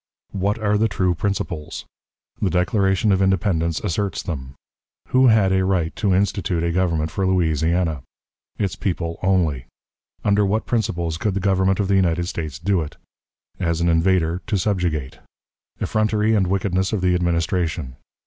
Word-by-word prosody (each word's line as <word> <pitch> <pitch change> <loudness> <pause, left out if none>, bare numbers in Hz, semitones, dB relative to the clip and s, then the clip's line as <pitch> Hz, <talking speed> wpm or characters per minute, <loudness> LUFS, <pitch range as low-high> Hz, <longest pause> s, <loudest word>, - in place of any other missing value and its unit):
What 100 +2 -1
are 105 -1 +1
the 110 - +3
True 95 -3 0
Principles? 85 -4 -3 0.6
The 100 - +2
Declaration 95 +3 +2
of 95 0 +2
Independence 95 -4 +1
asserts 100 +1 -2
them. 65 -5 -6 0.5
Who 130 0 +5
had 105 -5 +4
a 95 0 +2
Right 90 -4 0
to 100 -3 +2
institute 95 -3 0
a 85 - 0
Government 85 -3 0
for 95 +2 -1
Louisiana? 80 -3 +1 0.6
Its 100 -4 -1
People 85 -3 -3
only. 85 -10 +1 0.6
Under 105 0 +3
what 105 +3 0
Principles 85 -8 -1
could 105 -4 -1
the - - 0
Government 95 0 +2
of 100 - +1
the 100 0 +3
United 85 -2 +1
States 80 -7 -4
do 95 +2 +1
it? 75 - -7 0.6
As 85 -2 0
an 85 0 +2
Invader 85 0 +2
to 105 -2 +1
subjugate. 90 -8 -1 0.6
Effrontery 110 0 +1
and 100 -4 +2
Wickedness 95 0 0
of 105 - 0
the 90 -1 +2
Administration. 85 -5 -1
95 Hz, 155 wpm, -22 LUFS, 85-100 Hz, 0.6 s, Who